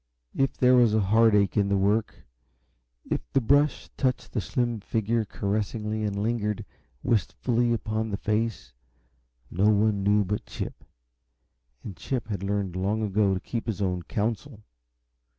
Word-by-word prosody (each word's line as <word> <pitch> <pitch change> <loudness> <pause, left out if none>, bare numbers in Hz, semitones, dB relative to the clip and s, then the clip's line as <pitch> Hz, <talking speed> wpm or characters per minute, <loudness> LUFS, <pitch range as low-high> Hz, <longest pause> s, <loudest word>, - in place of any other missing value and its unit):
If 135 0 0
there 125 0 +5
was 120 -3 +5
a - - +4
heartache 105 -1 +3
in 100 -1 +2
the 100 - +2
work, 105 +3 0 0.9
if - - +1
the 135 - +4
brush 145 +4 +2
touched 130 -3 -1
the 110 - -1
slim 120 +1 -1
figure 110 +2 -1
caressingly 105 +1 -2
and 105 -1 -1
lingered 105 -2 -1 0.4
wistfully 120 +2 +1
upon 110 -1 -1
the 100 - -2
face, 110 - -2 0.8
no 100 +4 +3
one 105 -1 +2
knew 105 +1 +3
but 105 +3 -3
Chip, - - -6 1.0
and 100 - -7
Chip 120 +7 -4
had 100 -3 -3
learned 100 -2 -2
long 100 +4 0
ago 100 -1 +2
to - - -2
keep 115 +4 -5
his 110 -3 -2
own 90 -3 -1
counsel. 110 - -3
105 Hz, 150 wpm, -26 LUFS, 100-115 Hz, 1.0 s, there